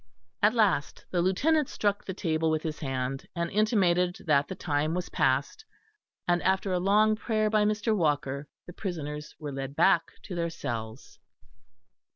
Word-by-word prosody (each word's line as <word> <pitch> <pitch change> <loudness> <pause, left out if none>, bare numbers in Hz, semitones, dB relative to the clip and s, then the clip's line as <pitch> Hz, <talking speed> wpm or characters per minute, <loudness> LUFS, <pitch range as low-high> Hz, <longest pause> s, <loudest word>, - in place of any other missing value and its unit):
At 210 +3 +4
last 200 -10 +1
the 175 - +1
Lieutenant 280 - +2
struck 205 -1 -1
the 190 - -5
table 160 -4 0
with 155 0 0
his 155 -2 -4
hand, 135 -2 -3
and 170 -1 -2
intimated 185 -4 +2
that 145 -3 +3
the 190 - -5
time 155 0 -1
was 180 0 -3
past, 130 - 0 0.6
and 175 -1 +2
after 190 +3 +1
a 180 - +1
long 210 +3 +4
prayer 215 -1 0
by 215 -1 +3
Mr. 215 +1 +1
Walker, 145 -5 0 0.2
the 175 - -10
prisoners 150 -6 -5
were 150 -2 -6
led 135 0 -5
back 175 -1 +3
to 195 - -7
their 170 -1 -1
cells. 115 -5 -6
175 Hz, 165 wpm, -28 LUFS, 145-205 Hz, 0.6 s, At